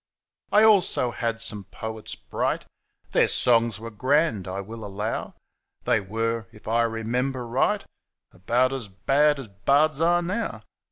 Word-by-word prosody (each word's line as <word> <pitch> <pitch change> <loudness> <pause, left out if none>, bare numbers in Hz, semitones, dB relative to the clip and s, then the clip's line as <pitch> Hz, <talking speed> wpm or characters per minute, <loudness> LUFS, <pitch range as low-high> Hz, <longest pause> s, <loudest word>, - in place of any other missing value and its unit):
I 210 +1 +6
also 195 - +4
had 115 -1 -2
some 105 -3 -4
poets 110 -1 -6
bright - - -2 0.2
— - - -38
Their - - +4
songs 115 -3 +2
were 115 +1 -7
grand, 130 - +1
I 95 +1 -4
will 110 +3 -8
allow 105 +2 -4 0.2
— - - -48
They - - +3
were, 115 +2 -2
if 110 - -16
I 115 +2 +2
remember 120 +3 -2
right. 135 - +1 0.5
About 125 +8 +1
as 130 -6 -4
bad 140 +9 +2
as 135 -4 -7
bards 140 +10 +2
are 175 +1 +3
now. 205 +6 -3
115 Hz, 155 wpm, -25 LUFS, 110-140 Hz, 0.5 s, I